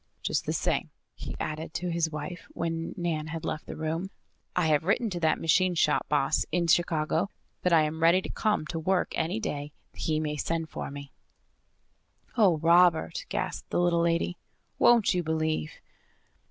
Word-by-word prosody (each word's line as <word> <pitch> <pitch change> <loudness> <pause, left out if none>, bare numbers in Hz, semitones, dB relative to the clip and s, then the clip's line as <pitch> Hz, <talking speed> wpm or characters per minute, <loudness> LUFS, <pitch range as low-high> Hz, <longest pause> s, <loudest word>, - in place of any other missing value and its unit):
Just - - -1
the - - +1
same," - - 0 0.2
he - - -7
added 155 +1 -4
to 180 0 -2
his 165 -1 +1
wife, 160 +3 -6
when 165 0 -3
Nan 165 -3 -2
had 165 0 -5
left 155 - -4
the - - -6
room, 160 +4 -3 0.5
"I 180 - +2
have 155 -1 +3
written 210 +5 +1
to 175 - -3
that 160 -2 +2
machine 180 +2 +3
shop 150 -3 +2
boss 145 0 +2
in 175 +1 +1
Chicago 165 +2 +2 0.3
that 180 - +1
I 165 -2 +6
am 155 +1 -3
ready 170 +3 +6
to - - -6
come 210 -7 0
to 165 +1 -4
work 180 +3 +1
any 170 +6 -1
day 145 -8 -4 0.2
he 155 -1 -1
may 150 -1 -2
send 165 +2 -2
for - - -5
me." 140 0 -9 1.2
"Oh, 200 -9 +4
Robert!" 170 - +3
gasped - - -3
the - - 0
little 175 -1 +3
lady. 170 +1 0 0.4
"Won't 235 -4 +5
you 180 - +1
believe?" 155 -1 -1
165 Hz, 175 wpm, -28 LUFS, 155-175 Hz, 1.2 s, I